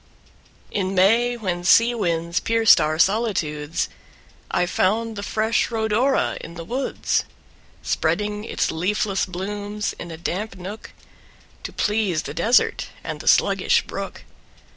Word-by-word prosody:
In 190 -1 -1
May, 230 +6 +4
when 180 -6 -3
sea 230 +6 +5
winds 170 -6 -1
pierced 225 -1 +5
our 155 +1 0
solitudes, 170 -6 0 0.6
I - - +1
found 220 +5 0
the 200 - -5
fresh 220 +2 0
Rhodora 225 +4 +1
in 170 - -9
the 165 - -6
woods, 255 +9 -1 0.6
Spreading 210 0 -1
its - - -1
leafless 195 +4 0
blooms 205 +3 -4
in 170 - -7
a 165 - -7
damp 185 +5 -4
nook, 195 +4 -8 0.7
To - - -6
please 205 -7 0
the - - -6
desert 240 +3 +2 0.2
and - - -5
the - - -10
sluggish - - +4
brook. - - -6
205 Hz, 130 wpm, -22 LUFS, 175-225 Hz, 0.7 s, sea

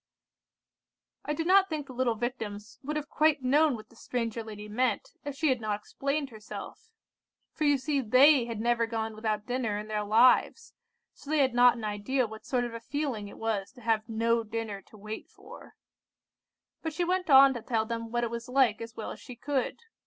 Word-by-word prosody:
"I 300 - -1
do 325 - -2
not 385 +2 +5
think 305 -3 -3
the 265 - -10
little 245 -2 +1
Victims 215 -3 -5
would 295 +3 -4
have 300 -1 -3
quite 305 -3 +2
known 290 +2 +4
what 215 - -11
the - - -20
stranger 230 -1 -3
lady 210 -1 -8
meant, 245 +4 -1
if 285 -1 -5
she 310 +1 +1
had 255 -3 +1
not 210 -1 -2
explained 275 +5 -3
herself; 225 - -9 0.6
for 310 - -1
you 290 -1 +4
see 280 +1 0
they 260 +3 +6
had 230 -2 -5
never 235 0 +1
gone 225 -1 -3
without 215 -1 -2
dinner 245 -4 -1
in 210 +1 -6
their 210 -1 -1
lives, 235 - +3 0.4
so 285 - -14
they 310 - +2
had 265 -4 +3
not 245 0 +6
an 230 - -7
idea 215 +5 0
what 220 0 -10
sort 250 -2 +1
of 240 -1 -4
a 230 - -5
feeling 255 -5 -3
it - - -12
was 215 -3 -2
to 250 - -15
have 225 -1 0
no 230 +1 +1
dinner 220 -2 -5
to 215 - -16
wait 215 +2 -7
for. 420 +3 -14 1.1
But 320 -2 -4
she 350 - -1
went 365 0 0
on 270 -1 +8
to 240 - -6
tell 225 -1 0
them 230 0 -4
what 240 0 0
it 235 - -2
was 235 +1 -6
like 250 -5 +3
as 230 0 -8
well 220 - -5
as - - -9
she 250 - -10
could. 275 - -2
240 Hz, 210 wpm, -29 LUFS, 220-280 Hz, 1.1 s, on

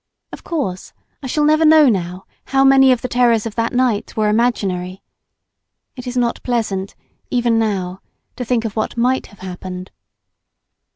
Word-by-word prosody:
Of - - -9
course, 260 - -4 0.3
I 270 - -6
shall 300 +4 0
never 310 +2 +4
know 310 -2 +7
now 185 -4 -1 0.2
how 270 0 +2
many 270 -1 +6
of 250 - 0
the - - -1
terrors 240 -3 +2
of 225 - -4
that 230 +1 -1
night 245 -5 0
were 215 -1 +2
imaginary. 195 -5 -1 0.9
It 250 -2 -9
is 250 0 -4
not 240 -1 0
pleasant, 210 -6 -2 0.3
even 240 -2 +1
now, 190 -4 -2 0.3
to 250 - -4
think 235 -1 0
of 220 - -4
what 220 +1 -2
might 255 +2 +1
have 205 - -18
happened. 185 0 -7
230 Hz, 165 wpm, -18 LUFS, 195-255 Hz, 0.9 s, know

